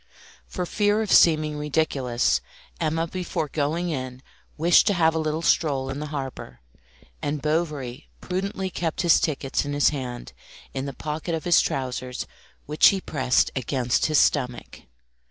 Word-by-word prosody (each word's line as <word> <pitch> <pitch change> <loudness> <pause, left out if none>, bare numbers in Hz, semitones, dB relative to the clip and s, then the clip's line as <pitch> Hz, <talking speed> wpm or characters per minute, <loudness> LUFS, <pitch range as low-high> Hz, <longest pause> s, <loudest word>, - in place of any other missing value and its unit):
For 180 - -4
fear 210 +3 +1
of 210 - -4
seeming 155 -2 +5
ridiculous, 145 -5 0 0.4
Emma 160 0 0
before 170 -2 -3
going 160 +5 -1
in 130 -2 -5 0.3
wished 170 +5 +5
to 205 - +3
have 165 -2 +3
a 160 - -1
little 155 +1 -2
stroll 135 -5 +1
in 135 - -5
the 150 - -4
harbour, 135 - -6 0.6
and 145 +1 -2
Bovary 150 -4 -2
prudently 190 +1 -3
kept 165 -3 -2
his 170 -2 +5
tickets 140 -3 -1
in 145 0 -4
his 145 0 +4
hand, 125 -4 -6 0.4
in 135 +1 -3
the 140 - -5
pocket 155 +4 -4
of 160 - -5
his 175 -1 +5
trousers, 130 -1 -3 0.4
which 150 +1 +5
he 195 - +3
pressed 130 -8 +1
against 125 -1 0
his 155 -1 +2
stomach. 125 -5 0
150 Hz, 155 wpm, -24 LUFS, 135-165 Hz, 0.6 s, seeming